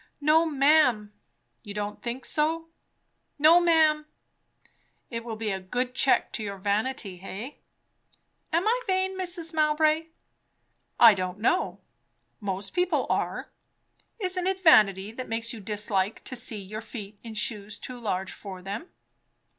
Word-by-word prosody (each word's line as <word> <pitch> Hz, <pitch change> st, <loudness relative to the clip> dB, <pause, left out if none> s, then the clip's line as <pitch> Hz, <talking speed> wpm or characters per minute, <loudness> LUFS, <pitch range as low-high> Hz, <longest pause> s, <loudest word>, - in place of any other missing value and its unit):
"No, 310 Hz, +3 st, +4 dB
ma'am." 275 Hz, -8 st, +3 dB, 0.5 s
"You 205 Hz, -2 st, -9 dB
don't 205 Hz, 0 st, -4 dB
think 245 Hz, +2 st, -4 dB
so." 325 Hz, +2 st, 0 dB, 0.7 s
"No, 315 Hz, +4 st, +7 dB
ma'am." 315 Hz, -3 st, +3 dB, 1.0 s
"It 230 Hz, -1 st, -4 dB
will 230 Hz, -1 st, -5 dB
be 215 Hz, -1 st, -2 dB
a 190 Hz, -, -2 dB
good 245 Hz, +7 st, -3 dB
check 265 Hz, +1 st, +2 dB
to 220 Hz, -, -3 dB
your 200 Hz, -1 st, -5 dB
vanity, 200 Hz, -1 st, -2 dB
eh?" 210 Hz, +7 st, -6 dB, 1.0 s
"Am 340 Hz, +6 st, +1 dB
I 485 Hz, +3 st, +2 dB
vain, 375 Hz, 0 st, 0 dB
Mrs. 350 Hz, -3 st, -2 dB
Mowbray?" 310 Hz, +1 st, +2 dB, 0.9 s
"I 230 Hz, -2 st, +9 dB
don't 185 Hz, -1 st, -3 dB
know! 235 Hz, -, 0 dB, 0.6 s
most 195 Hz, -1 st, -4 dB
people 360 Hz, 0 st, +1 dB
are. -, -, -2 dB, 0.7 s
Isn't 370 Hz, -3 st, -1 dB
it 380 Hz, 0 st, -1 dB
vanity, 205 Hz, -, +5 dB
that 255 Hz, +3 st, -7 dB
makes 230 Hz, +1 st, -2 dB
you 230 Hz, -, -8 dB
dislike 205 Hz, -1 st, -1 dB
to 260 Hz, -, -6 dB
see 235 Hz, -2 st, -2 dB
your 205 Hz, +2 st, -7 dB
feet 210 Hz, -3 st, -9 dB
in 225 Hz, -2 st, -9 dB
shoes 210 Hz, -1 st, -2 dB
too 250 Hz, -1 st, -8 dB
large 190 Hz, -4 st, -2 dB
for 190 Hz, -3 st, -9 dB
them?" 200 Hz, -, -6 dB
235 Hz, 140 wpm, -27 LUFS, 205-315 Hz, 1.0 s, I